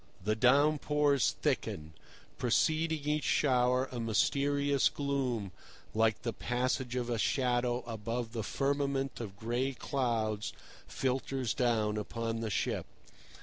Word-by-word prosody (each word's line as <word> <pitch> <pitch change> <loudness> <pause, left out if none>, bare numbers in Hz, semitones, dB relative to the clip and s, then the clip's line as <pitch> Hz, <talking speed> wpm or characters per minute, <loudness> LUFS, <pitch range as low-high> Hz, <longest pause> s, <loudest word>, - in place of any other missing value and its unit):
The 105 +2 +1
down 140 +6 +4
pours 145 -2 +2
thicken. 80 +1 -1 0.5
Preceding 155 +4 +1
each 150 0 +1
shower 125 -1 +2
a 125 - -4
mysterious 140 +5 +2
gloom, 130 -8 -2 0.4
like 110 0 +2
the 115 - -2
passage 125 +2 -1
of 125 -1 -1
a 120 -2 -1
shadow 125 0 +1
above 115 +1 -4
the 115 -1 -3
firmament 135 +4 -1
of 100 -4 -7
gray 120 +5 -1
clouds, 115 -5 -1 0.3
filters 130 -1 -1
down 110 -4 +1
upon 115 +2 -3
the 115 -1 -2
ship. - - -1
125 Hz, 120 wpm, -32 LUFS, 115-140 Hz, 0.5 s, down